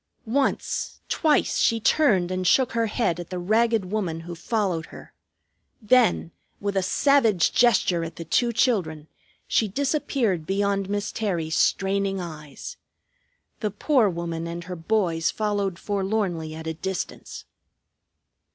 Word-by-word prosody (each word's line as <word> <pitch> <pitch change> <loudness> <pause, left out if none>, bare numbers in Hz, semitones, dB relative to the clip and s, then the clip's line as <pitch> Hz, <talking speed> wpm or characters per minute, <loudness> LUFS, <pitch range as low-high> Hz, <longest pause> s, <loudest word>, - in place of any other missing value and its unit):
Once, 265 +4 -1
twice, 310 -3 +2
she 230 - +3
turned 210 - +3
and 185 0 -1
shook 260 +6 +4
her 230 -1 0
head 210 -6 0
at 175 - -7
the 185 - -4
ragged 215 +1 +1
woman 180 -7 -2
who 175 +1 -7
followed 180 -3 -2
her. - - -13 0.7
Then, 230 -6 +3 0.3
with 200 0 -3
a 195 - +2
savage 225 - +3
gesture 195 -8 +3
at 165 - -6
the 165 - -7
two 235 +9 +2
children, 175 - 0 0.4
she 220 - +2
disappeared 240 - -1
beyond 200 0 0
Miss 205 0 -2
Terry's 170 -7 -2
straining 195 0 +1
eyes. 155 -5 -8 0.8
The 210 - -1
poor 225 +2 +2
woman 170 -1 -4
and 170 +1 -5
her 180 +1 -6
boys 170 -2 0
followed 205 -4 -1
forlornly 190 -6 -2
at 160 0 -8
a 160 - -2
distance. 190 +3 -5
195 Hz, 135 wpm, -24 LUFS, 170-220 Hz, 0.8 s, shook